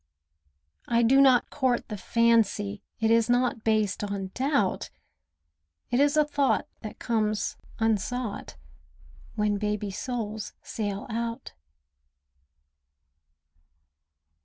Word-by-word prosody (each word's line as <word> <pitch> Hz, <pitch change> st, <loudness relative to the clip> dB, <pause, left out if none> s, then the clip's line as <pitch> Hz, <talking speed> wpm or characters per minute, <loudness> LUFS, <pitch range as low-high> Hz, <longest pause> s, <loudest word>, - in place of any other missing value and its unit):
I 235 Hz, 0 st, +3 dB
do 265 Hz, +4 st, +5 dB
not 260 Hz, -3 st, +4 dB
court 255 Hz, -2 st, 0 dB
the 210 Hz, -, -5 dB
fancy, 210 Hz, -2 st, +1 dB, 0.2 s
It 225 Hz, 0 st, +2 dB
is 230 Hz, 0 st, +3 dB
not 245 Hz, -2 st, +1 dB
based 215 Hz, -2 st, +1 dB
on 200 Hz, -2 st, -4 dB
doubt, 265 Hz, -7 st, 0 dB, 1.0 s
It 245 Hz, -, +2 dB
is 290 Hz, +1 st, +3 dB
a 305 Hz, -, +5 dB
thought 285 Hz, -2 st, +1 dB
that 215 Hz, -, -8 dB
comes 215 Hz, -3 st, -1 dB, 0.2 s
unsought 225 Hz, -, -2 dB, 0.8 s
When 210 Hz, -1 st, +1 dB
baby 210 Hz, -1 st, -2 dB
souls 220 Hz, -1 st, -4 dB
sail 205 Hz, -2 st, -4 dB
out. 230 Hz, +1 st, -4 dB
225 Hz, 100 wpm, -27 LUFS, 210-245 Hz, 1.0 s, do